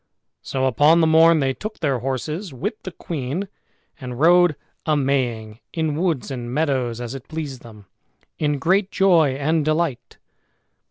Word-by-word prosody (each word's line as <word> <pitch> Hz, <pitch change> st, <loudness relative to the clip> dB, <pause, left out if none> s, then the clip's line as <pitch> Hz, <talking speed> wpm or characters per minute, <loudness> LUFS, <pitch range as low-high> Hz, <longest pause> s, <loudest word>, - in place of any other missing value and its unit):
So 130 Hz, -1 st, -2 dB
upon 145 Hz, +6 st, +4 dB
the 165 Hz, -, +4 dB
morn 160 Hz, 0 st, +5 dB
they 135 Hz, -1 st, +1 dB
took 215 Hz, +9 st, -7 dB
their 140 Hz, -6 st, 0 dB
horses 150 Hz, -, -4 dB
with 205 Hz, -, -5 dB
the 185 Hz, -, -7 dB
queen, 160 Hz, +4 st, -4 dB, 0.5 s
and 125 Hz, -2 st, -7 dB
rode 175 Hz, 0 st, +5 dB, 0.3 s
a 155 Hz, -1 st, +1 dB
maying 120 Hz, -6 st, -1 dB
in 160 Hz, -3 st, -1 dB
woods 160 Hz, -5 st, -1 dB
and 120 Hz, -2 st, -5 dB
meadows, 130 Hz, -5 st, -1 dB
as 120 Hz, 0 st, -5 dB
it 135 Hz, -2 st, -9 dB
pleased 150 Hz, -5 st, -6 dB
them, 105 Hz, -3 st, -14 dB, 0.5 s
in 145 Hz, -1 st, 0 dB
great 185 Hz, +6 st, +1 dB
joy 170 Hz, -10 st, +3 dB
and 155 Hz, +3 st, 0 dB
delight. 155 Hz, -3 st, -2 dB
145 Hz, 155 wpm, -22 LUFS, 130-165 Hz, 0.5 s, morn